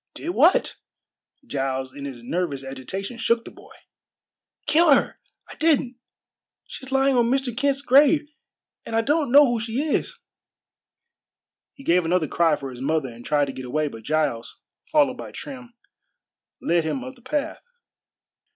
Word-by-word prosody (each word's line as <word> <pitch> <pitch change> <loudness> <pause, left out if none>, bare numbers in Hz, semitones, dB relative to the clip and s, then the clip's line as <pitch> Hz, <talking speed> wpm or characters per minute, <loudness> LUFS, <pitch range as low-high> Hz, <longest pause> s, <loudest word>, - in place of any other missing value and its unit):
"Did 330 - -5
what?" 350 +1 +3 0.7
Giles 135 - -3
in 140 -1 -8
his 125 -4 -8
nervous 145 -1 -2
agitation 190 - -6
shook 230 0 +1
the - - -9
boy. - - -16 0.9
"Killed 315 -2 +5
her! - - -1 0.3
I - - -10
didn't! 285 -6 +1 0.7
She's 265 0 -10
lying 270 0 +3
on 235 -1 +3
Mr. 265 -2 0
Kent's 275 +1 0
grave, 290 +3 +5 0.6
and 225 - -5
I 225 - +3
don't 290 +1 0
know 290 +2 +8
who 240 -3 0
she 225 +3 -3
is." 305 +1 -1 1.6
He 275 - -14
gave 180 -6 +3
another 165 -1 +1
cry 165 +1 +2
for 135 -2 -7
his 125 0 -10
mother 145 -1 0
and 120 0 -12
tried 145 +1 +2
to 135 - -5
get 130 - -7
away, 150 +4 -1
but 115 -4 -10
Giles, 150 -3 -2 0.3
followed 285 -4 +3
by - - -8
Trim, 250 -4 -9 0.8
led 170 0 +1
him 255 - -3
up 260 0 -8
the 250 - -21
path. 275 +3 -3
230 Hz, 160 wpm, -24 LUFS, -, 1.6 s, know